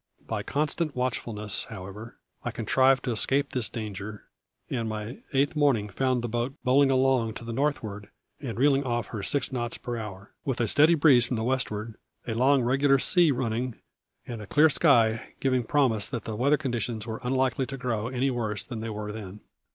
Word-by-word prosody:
By - - -3
constant 155 +1 -1
watchfulness, 115 -5 -1
however, 100 +5 -9 0.3
I - - -2
contrived 130 0 +2
to 125 - -1
escape 135 +5 +1
this 125 -4 0
danger, 105 -1 -6 0.4
and 115 -4 -2
my 110 +3 -5
eighth 140 +2 +1
morning 135 -9 +2
found 130 +3 0
the - - -1
boat 120 +4 -2
bowling 135 +2 +4
along 130 -4 +2
to 115 - -8
the 115 - -4
northward 110 -7 -2 0.3
and 120 -6 -5
reeling 140 +1 +3
off 120 -2 -2
her 110 - -5
six 140 +7 -1
knots 120 -2 -3
per 120 -1 -5
hour, 100 -3 -8
with 130 -3 -2
a 115 - +1
steady 155 +8 +5
breeze 140 -6 +5
from 125 - -2
the 110 - -2
westward, 115 -3 -2 0.3
a 115 - -1
long, 130 +3 +3
regular 135 +3 +3
sea 175 +5 +4
running, 125 -2 -1 0.5
and 115 -3 -6
a 105 - -9
clear 150 +6 +5
sky 115 -8 +3
giving 130 -2 +1
promise 115 -5 +1
that 115 -4 -4
the 110 - -5
weather 140 +6 +3
conditions 120 -5 -3
were 110 -1 -5
unlikely 130 +1 0
to 135 - -6
grow 115 -4 -2
any 130 +2 0
worse 110 -5 -3
than 120 -4 -6
they 115 +1 -4
were 105 -1 -5
then. 105 -1 -8
120 Hz, 190 wpm, -27 LUFS, 110-135 Hz, 0.5 s, steady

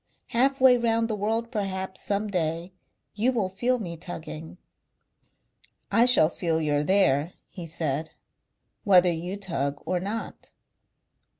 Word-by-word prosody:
Half 270 +4 +2
way 255 -1 +7
round 230 -1 +1
the 220 - -2
world 225 +3 -2
perhaps 190 -4 -3
some 205 +1 -1
day 170 -1 -2 0.4
you 225 +5 +1
will 215 -7 -1
feel 240 +7 0
me 175 -7 -6
tugging." 160 -1 -8 1.3
"I 235 +2 +5
shall 245 -11 +6
feel 165 -1 -1
you're 145 -2 +1
there," 155 -3 +2
he 175 -3 -9
said, 155 -1 -2 0.7
"whether 180 -3 +5
you 175 +4 -5
tug 145 -8 -3
or 180 - 0
not...." 205 +5 -6
190 Hz, 130 wpm, -26 LUFS, 165-225 Hz, 1.3 s, way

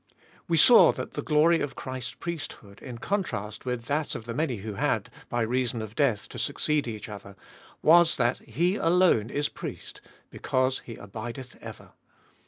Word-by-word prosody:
We 170 -2 +2
saw 235 +9 +8
that - - -6
the - - -3
glory 160 +2 +3
of 145 - -3
Christ's 130 -1 -6
priesthood, 145 -11 -7
in 125 -3 -8
contrast 115 - -3
with 125 -2 -3
that 150 +3 -1
of 110 - -7
the 115 - -5
many 135 -1 -1
who 105 +1 -6
had, - - -1 0.2
by 120 - -1
reason 120 0 -1
of 110 -1 -6
death, 120 -9 +1
to - - -8
succeed 150 -3 0
each 110 -3 -6
other, 100 -2 -10 0.5
was, 170 +1 +6
that 120 -1 +1
He 180 +6 0
alone 170 - +3
is 145 +2 0
Priest, - - -8 0.3
because 130 0 0
He 115 - -10
abideth 115 +5 -8
ever. - - -10
130 Hz, 170 wpm, -27 LUFS, 115-155 Hz, 0.5 s, saw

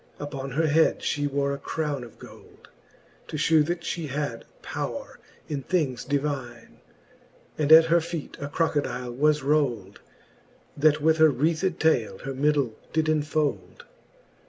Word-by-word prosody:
Uppon 140 -2 -5
her 160 +4 +1
head 160 +1 +3
fhe 145 -1 -1
wore 140 0 0
a 140 - -5
crowne 145 -2 -3
of 115 - -13
gold, - - -15 0.6
To 155 - -5
ftiew, 155 +1 +4
that 175 0 -2
fhe 165 -2 -4
had 140 -4 -4 0.2
powre - - -5 0.3
in 145 -3 -3
things 135 -5 -1
divine; 135 -5 -4 0.8
And 150 0 0
at 160 +1 +10
her 170 +1 +4
feete 165 -2 -6
a 140 - -3
crocodile 145 -5 -1
was 150 +3 +2
rold, 125 -9 0 0.8
That 150 0 +3
with 160 0 +4
her 160 -1 +6
wreathed 160 +6 0
taile 120 -11 +1
her 135 +1 -4
middle 140 -3 +1 0.2
did 155 0 +1
enfold. 150 - -1
145 Hz, 145 wpm, -26 LUFS, 135-160 Hz, 0.8 s, at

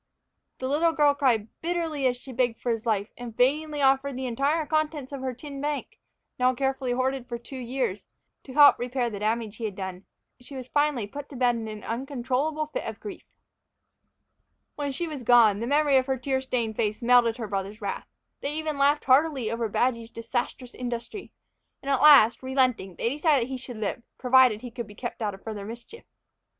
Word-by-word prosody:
The 260 - -3
little 320 +4 +2
girl 295 -2 +4
cried 250 -7 +1
bitterly 325 -5 -1
as 250 -1 0
she 260 +1 -10
begged 245 -2 0
for 245 - -1
his 225 0 -3
life, 210 -1 0
and 235 -2 -8
vainly 295 +3 +1
offered 270 0 +3
the 260 - -3
entire 280 +6 0
contents 305 -2 -1
of 275 -2 -6
her 260 -2 -3
tin 280 +2 -8
bank, 295 0 -4 0.4
now 255 0 +3
carefully 265 -1 -1
hoarded 260 0 -1
for 240 - -3
two 255 +3 -9
years, 245 -5 -3 0.4
to 260 - -9
help 290 0 +7
repair 245 0 -1
the 205 - -5
damage 215 0 -1
he 230 - -4
had 205 -3 -4
done. 190 -1 -6 0.3
She 250 +3 -11
was 255 -2 -7
finally 290 -5 +1
put 285 +7 -8
to 280 - -10
bed 245 -1 +2
in 225 -1 -4
an 215 -1 -7
uncontrollable 270 +5 -2
fit 405 +12 -5
of - - -6
grief. 410 -2 -8 1.5
When 285 -1 -3
she 335 +6 -3
was 300 -4 -6
gone, 230 -4 +5
the 230 - -3
memory 290 0 +4
of 260 0 +1
her 265 -1 0
tear 265 +1 -1
stained 235 -4 -2
face 215 +1 -1
melted 240 -1 +4
her 225 -3 -4
brothers' 200 +1 -4
wrath. 200 -3 -4 0.3
They 285 +2 -3
even 310 -2 -3
laughed 285 +2 +3
heartily 265 -4 +3
over 230 -1 -2
Badgy's 230 0 0
disastrous 240 +2 -4
industry; 245 - -6 0.5
and 275 - -2
at 270 - +2
last, 280 -7 +7
relenting, 255 -8 0
they 230 - -1
decided 290 -1 +2
that - - -12
he 260 - -2
should 250 -2 -8
live, 215 +2 -3 0.2
provided 255 -4 +4
he 245 - -8
could 235 -2 -6
be 205 - -13
kept 240 0 -6
out 205 -3 -1
of 195 - -18
further 215 -3 -6
mischief. 235 - -10
255 Hz, 200 wpm, -26 LUFS, 230-280 Hz, 1.5 s, help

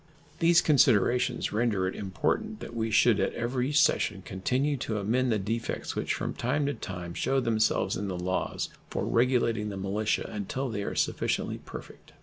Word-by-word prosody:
These 165 0 +5
considerations 125 -4 +3
render 105 -4 +1
it 95 - -3
important 215 - -2
that 115 - -8
we 115 -1 -1
should 110 0 +4
at 95 - 0
every 125 +3 -1
session 150 - +2
continue 130 +10 0
to 110 -3 -3
amend 120 +5 +1
the 110 - +2
defects 115 +4 -3
which - - -1
from - - -3
time 140 +4 0
to 145 - 0
time 90 -6 -6
shew 135 +9 +1
themselves 115 -3 +1
in 100 - -3
the 95 -2 -3
laws 90 +1 -2 0.2
for - - -2
regulating 115 -3 +2
the 100 - -5
militia 100 +3 -1
until 115 +6 -3
they 105 -3 -3
are - - -4
sufficiently - - -1
perfect. - - -11
115 Hz, 170 wpm, -28 LUFS, 100-130 Hz, 0.2 s, These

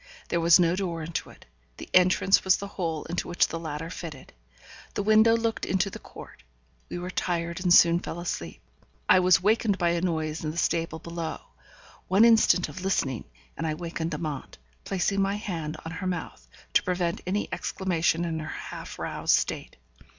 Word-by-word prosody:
There 170 - +1
was 170 +1 +6
no 170 0 +3
door 175 -4 -3
into 165 +1 -4
it; - - -16 0.3
the - - -8
entrance 185 +1 +5
was 190 0 +4
the 200 - -6
hole 165 -6 -3
into 175 - -3
which 175 -1 +2
the 165 - -4
ladder 160 0 -5
fitted. 155 -7 -8 0.6
The 205 - -1
window 220 +2 +5
looked 230 -1 -2
into 190 +1 0
the - - -8
court. - - -13 0.5
We - - -4
were 180 +1 -5
tired 170 -1 -2
and 180 -2 +1
soon 170 0 +7
fell 175 - -6
asleep. 85 - -5 0.5
I - - +6
was 185 -1 +4
wakened 215 -1 +2
by 175 -2 +2
a 170 0 0
noise 160 -3 -2
in 155 - -2
the 155 - -6
stable 165 -2 0
below. 170 0 -5 0.7
One 195 +5 +5
instant 220 -5 +5
of 190 - -8
listening, 140 -10 -1 0.3
and - - -3
I 155 - -1
wakened 165 0 -4
Amante, 150 -5 -5 0.3
placing 195 +1 0
my 195 +1 +1
hand 165 -7 -4
on 160 - -5
her 185 +3 -4
mouth, 65 - -5 0.3
to - - +5
prevent 180 -2 -1
any 200 +3 0
exclamation 175 -2 0
in 160 -1 -2
her 155 - -6
half - - -7
roused - - +1
state. - - -4
175 Hz, 185 wpm, -27 LUFS, 165-190 Hz, 0.7 s, soon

